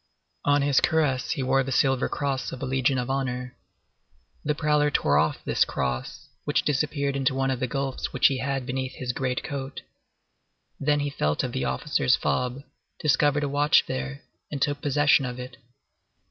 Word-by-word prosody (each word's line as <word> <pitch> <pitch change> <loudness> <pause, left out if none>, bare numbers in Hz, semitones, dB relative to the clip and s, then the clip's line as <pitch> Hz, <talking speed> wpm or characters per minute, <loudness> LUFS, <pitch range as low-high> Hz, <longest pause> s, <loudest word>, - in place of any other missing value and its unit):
On 145 0 +3
his 140 -2 +3
cuirass 150 -6 +1
he 140 -5 -1
wore 135 +1 +3
the 135 0 -3
silver 135 0 +2
cross 135 -3 -2
of 130 - -7
the 135 - -3
Legion 130 0 +1
of 125 -1 -1
Honor. 125 -2 -3 0.9
The 150 0 0
prowler 150 -1 +2
tore 75 - +2
off 80 +1 0
this - - +3
cross, 65 -1 -3 0.2
which - - +1
disappeared 140 -1 0
into 135 -1 +1
one 135 0 +1
of 130 - -2
the 130 - 0
gulfs 135 +1 -3
which 130 - 0
he 135 -2 +5
had 135 0 -2
beneath 130 0 -3
his 125 -1 -3
great 125 0 -2
coat. 135 -2 -5 1.0
Then 145 +1 +2
he 145 0 -2
felt 75 - 0
of - - -2
the - - -2
officer's 65 0 +1
fob, 125 +2 -1 0.4
discovered 145 -1 +2
a - - 0
watch 145 +2 +3
there, 65 +1 -4 0.3
and 145 - -3
took 145 +1 0
possession 145 0 +3
of 125 -1 -4
it. 125 +1 -8
135 Hz, 180 wpm, -26 LUFS, 125-145 Hz, 1.0 s, he